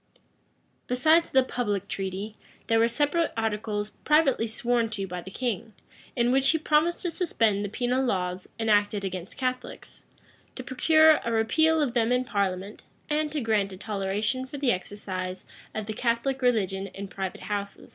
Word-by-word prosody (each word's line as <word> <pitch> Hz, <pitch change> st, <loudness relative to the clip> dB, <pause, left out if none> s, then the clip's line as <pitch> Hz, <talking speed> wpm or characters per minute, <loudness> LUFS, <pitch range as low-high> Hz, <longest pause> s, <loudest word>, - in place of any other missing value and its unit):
Besides 315 Hz, +7 st, +4 dB
the 265 Hz, 0 st, +4 dB
public 210 Hz, -6 st, -2 dB
treaty, 195 Hz, +2 st, -4 dB, 0.3 s
there 225 Hz, 0 st, +3 dB
were 230 Hz, -, +5 dB
separate 290 Hz, +7 st, +1 dB
articles, 210 Hz, -1 st, -2 dB
privately 300 Hz, -6 st, +3 dB
sworn 235 Hz, +1 st, 0 dB
to 205 Hz, -3 st, -3 dB
by 180 Hz, -1 st, -5 dB
the 190 Hz, -, -10 dB
king; 225 Hz, -1 st, -3 dB, 0.4 s
in 240 Hz, 0 st, +2 dB
which 270 Hz, +1 st, +3 dB
he 320 Hz, -, +4 dB
promised 310 Hz, +2 st, +1 dB
to 350 Hz, -, -1 dB
suspend 225 Hz, -, +1 dB
the 205 Hz, -, -3 dB
penal 250 Hz, +4 st, 0 dB
laws 185 Hz, -6 st, -2 dB
enacted 205 Hz, -2 st, +2 dB
against 185 Hz, -1 st, -6 dB
Catholics, 255 Hz, -1 st, -4 dB, 0.5 s
to 255 Hz, -, -6 dB
procure 315 Hz, +4 st, +5 dB
a 235 Hz, -, -2 dB
repeal 315 Hz, +9 st, +3 dB
of 255 Hz, -5 st, -1 dB
them 235 Hz, -1 st, +2 dB
in 250 Hz, 0 st, +2 dB
parliament, 200 Hz, -3 st, -2 dB, 0.3 s
and 300 Hz, 0 st, +1 dB
to 300 Hz, -1 st, -2 dB
grant 210 Hz, -4 st, +1 dB
a -, -, -9 dB
toleration 210 Hz, +5 st, -2 dB
for 285 Hz, -, -7 dB
the 270 Hz, -3 st, +2 dB
exercise 185 Hz, -1 st, -4 dB, 0.3 s
of 215 Hz, -, -3 dB
the 215 Hz, -, -4 dB
Catholic 240 Hz, +4 st, 0 dB
religion 195 Hz, -6 st, +1 dB
in 195 Hz, +1 st, -7 dB
private 190 Hz, -1 st, -5 dB
houses. 200 Hz, -1 st, -5 dB
225 Hz, 165 wpm, -27 LUFS, 200-260 Hz, 0.5 s, were